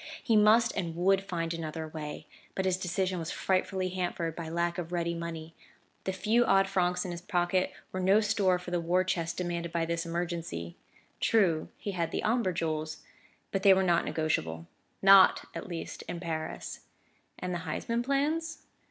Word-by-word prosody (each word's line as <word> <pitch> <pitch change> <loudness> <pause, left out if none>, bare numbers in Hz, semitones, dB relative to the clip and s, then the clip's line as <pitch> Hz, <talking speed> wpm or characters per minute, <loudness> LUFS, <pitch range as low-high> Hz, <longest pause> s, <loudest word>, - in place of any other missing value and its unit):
He 225 - +2
must 220 +3 +5
and 165 -2 -2
would 190 +3 +3
find 170 -3 -2
another 160 -1 -4
way; 155 -1 -6 0.3
but 190 - -1
his 185 -1 +2
decision 185 0 -1
was 165 0 -4
frightfully 185 0 0
hampered 175 -3 -2
by 165 -2 -5
lack 170 +2 -1
of 170 -1 -5
ready 170 -1 0
money; 165 -1 -6 0.5
the 190 - 0
few 220 +6 +2
odd 195 -3 +4
francs 180 -1 +1
in 180 - -4
his 170 0 -6
pocket 185 0 +1 0.2
were 185 - -3
no 190 +3 +5
store 205 -4 +2
for 180 0 -8
the 175 - +1
war 180 +2 +2
chest 170 -2 -2
demanded 170 -1 -2
by 165 -1 0
this 170 0 -1
emergency. 165 - -4 0.4
True, 180 -8 +2
he 205 - -4
had 170 -3 -1
the - - -3
Omber 225 -3 +2
jewels; 155 -2 -3 0.5
but 195 - -1
they 195 -1 +7
were 190 - +2
not 175 -2 +3
negotiable 85 - -1 0.4
not 195 -1 +7
at - - -6
least 170 -2 -6
in 175 - -4
Paris. 160 -2 -4 0.6
And 180 0 -3
the 175 - -2
Huysman 230 +7 -2
plans? 295 +5 -1
175 Hz, 180 wpm, -30 LUFS, 165-190 Hz, 0.6 s, they